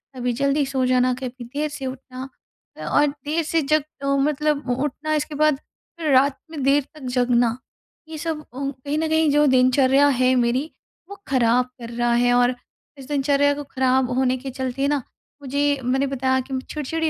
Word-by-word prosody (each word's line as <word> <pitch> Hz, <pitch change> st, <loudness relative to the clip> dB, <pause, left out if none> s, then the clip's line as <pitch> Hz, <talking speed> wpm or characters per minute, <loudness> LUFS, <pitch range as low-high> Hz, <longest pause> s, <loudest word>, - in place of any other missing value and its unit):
कभी 245 Hz, -1 st, -1 dB
जल्दी 280 Hz, +3 st, +1 dB
सो 265 Hz, -1 st, -1 dB
जाना, 255 Hz, 0 st, +3 dB
कभी 255 Hz, 0 st, -6 dB
देर 285 Hz, +6 st, -3 dB
से 290 Hz, -2 st, -7 dB
उठना 260 Hz, 0 st, -7 dB, 0.6 s
और 295 Hz, 0 st, +4 dB, 0.2 s
देर 315 Hz, +3 st, 0 dB
से 325 Hz, +1 st, 0 dB
जब 305 Hz, +1 st, +2 dB, 0.2 s
अ, -, -, -2 dB
मतलब 295 Hz, 0 st, 0 dB
उठना 295 Hz, +2 st, -2 dB
इसके 300 Hz, 0 st, -2 dB
बाद 305 Hz, 0 st, +3 dB, 0.4 s
फिर 310 Hz, -3 st, 0 dB
रात 270 Hz, +1 st, +4 dB
में 310 Hz, -3 st, -5 dB
देर 275 Hz, +2 st, +3 dB
तक 305 Hz, -, -13 dB
जगना। 245 Hz, -1 st, +2 dB, 0.5 s
ये 315 Hz, -, -6 dB
सब 315 Hz, -1 st, -3 dB
अ, -, -, -19 dB
कहीं 275 Hz, +1 st, -4 dB
न 320 Hz, +1 st, 0 dB
कहीं 315 Hz, 0 st, +3 dB
ओ -, -, +2 dB
जो 295 Hz, +1 st, +4 dB
दिनचर्या 260 Hz, +2 st, +4 dB
है 255 Hz, -2 st, +3 dB
मेरी 250 Hz, +5 st, +1 dB, 0.4 s
वो 400 Hz, -, -7 dB
खराब 250 Hz, -1 st, +3 dB, 0.2 s
कर 230 Hz, -, -7 dB
रहा 240 Hz, 0 st, 0 dB
है। 245 Hz, +1 st, +3 dB
और 245 Hz, +1 st, +3 dB, 0.4 s
इस 270 Hz, -2 st, -11 dB
दिनचर्या 285 Hz, 0 st, +2 dB
को 290 Hz, +1 st, -5 dB
खराब 260 Hz, -1 st, +2 dB
होने 260 Hz, -1 st, +2 dB
के 270 Hz, +2 st, -7 dB
चलते 260 Hz, +1 st, -2 dB
ना 290 Hz, -1 st, +1 dB, 0.4 s
मुझे 285 Hz, +1 st, 0 dB
मैंने 265 Hz, +3 st, +1 dB
बताया 260 Hz, -1 st, 0 dB
कि 260 Hz, 0 st, -4 dB
चिड़चिड़ी 315 Hz, +2 st, -2 dB
270 Hz, 185 wpm, -22 LUFS, 255-290 Hz, 0.6 s, और